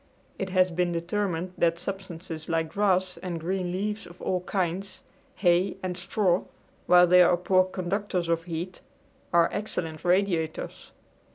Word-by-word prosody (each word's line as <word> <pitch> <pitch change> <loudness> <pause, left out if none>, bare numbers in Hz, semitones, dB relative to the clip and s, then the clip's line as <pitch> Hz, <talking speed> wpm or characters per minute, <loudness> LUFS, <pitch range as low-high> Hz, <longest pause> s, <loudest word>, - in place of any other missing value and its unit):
It 195 - -2
has 185 -1 +3
been 175 +1 0
determined 175 +1 -2
that 170 0 +3
substances 175 -4 -6
like 165 -1 0
grass 190 -3 +1
and 175 -1 -4
green 180 +2 -2
leaves 205 +1 -3
of 175 0 -14
all 185 -1 -1
kinds, 190 0 -2 0.3
hay 180 0 +2
and 180 -1 -2
straw, 180 0 +1 0.4
while 180 0 +7
they 180 +1 +6
are 175 0 +5
poor 185 +1 +3
conductors 185 -1 -2
of 165 0 0
heat, 175 +2 -5 0.5
are 170 -1 +5
excellent 165 -6 -3
radiators. 175 -3 0
180 Hz, 145 wpm, -27 LUFS, 170-190 Hz, 0.5 s, while